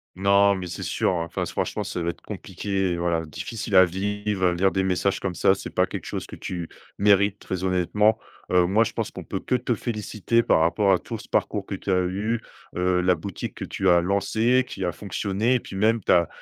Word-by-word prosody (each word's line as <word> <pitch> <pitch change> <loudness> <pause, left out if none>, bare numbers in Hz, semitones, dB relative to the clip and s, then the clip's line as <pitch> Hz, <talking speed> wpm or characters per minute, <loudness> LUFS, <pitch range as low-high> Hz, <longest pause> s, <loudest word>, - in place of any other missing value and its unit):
Non, 100 +1 +4
mais 95 -1 -5
c'est 85 - -6
sûr, - - 0
enfin 85 -1 -2
s - - -5
franchement - - -2
ça 90 - -4
doit 85 - -1
être 85 - -7
compliqué, 95 0 -3
et 85 - -3
voilà 85 -1 0
difficile 105 - -4
à 95 0 +9
vivre, 100 +1 -2
heu, 90 - +3
lire 95 +2 +3
des 95 - 0
messages 95 +1 0
comme 95 -3 -3
ça. - - +4
C'est 95 - -6
pas - - +2
quelque - - -7
chose - - -4
que - - -10
tu 85 -3 -5 0.3
mérites 100 0 +4
très 95 -2 -5
honnêtement, 95 +4 +2 0.3
heu, 90 -1 +5
moi, 105 +6 +3
je - - -4
pense - - -3
qu'on - - -8
peut - - -3
que - - -3
te 120 -1 0
féliciter. 110 0 -1
Par 80 - +3
rapport 90 +5 +3
à 95 - +5
tout 115 +5 -7
ce - - -12
parcours 100 -2 0
que 100 - -3
tu 95 - -4
as 90 - +3
eu, 105 +5 -1 0.3
heu, 90 0 +2
la 90 0 +4
boutique 90 +2 -6
que - - -5
tu 95 -1 0
as 85 -1 +5
lancée. 110 +7 +2
Qui 95 - -6
a 90 - 0
fonctionné, 100 +6 -1
et 125 - +2
puis 95 - -10
même 110 +3 +2
tu - - +1
as 85 -2 +5
95 Hz, 240 wpm, -24 LUFS, 90-105 Hz, 0.3 s, à